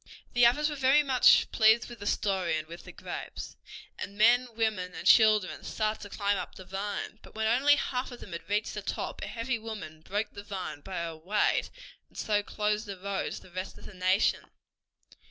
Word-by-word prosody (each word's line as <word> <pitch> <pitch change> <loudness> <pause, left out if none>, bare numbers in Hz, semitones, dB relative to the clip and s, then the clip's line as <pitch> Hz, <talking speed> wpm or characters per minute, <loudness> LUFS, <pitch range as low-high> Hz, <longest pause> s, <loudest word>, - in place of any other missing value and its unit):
The 245 -1 +7
others 295 +5 +2
were 300 - -3
very 275 +2 +4
much 260 -3 +5
pleased 220 +1 +4
with 240 -2 -10
the 205 - -6
story 185 -7 0
and 155 0 -5
with 170 +1 -10
the - - -9
grapes, - - -7 0.4
and 200 +1 -6
men, 240 +4 +5
women 210 -5 -1
and - - -7
children 215 -4 +5
started 215 0 -2
to - - -9
climb 200 -1 +1
up - - -7
the 185 - -11
vine. 200 +3 -4
But - - -16
when 220 0 -1
only 265 +6 +5
half 255 -2 -2
of 245 - -9
them 195 - -11
had 170 +1 -7
reached 210 +2 0
the - - -4
top - - -4
a - - -4
heavy 230 +1 -2
woman 210 -9 -7
broke 205 +5 -3
the 200 - -8
vine 190 -7 -6
by 190 +5 -7
her 165 -1 -5
weight, 195 +6 +1 0.4
and - - -18
so 210 -1 +1
closed 210 +1 -1
the 200 -1 -6
road 195 +1 -3
to - - -7
the 185 - -16
rest 185 +2 -6
of - - -14
the - - -10
nation. 185 +2 +1
210 Hz, 210 wpm, -29 LUFS, 190-230 Hz, 0.4 s, The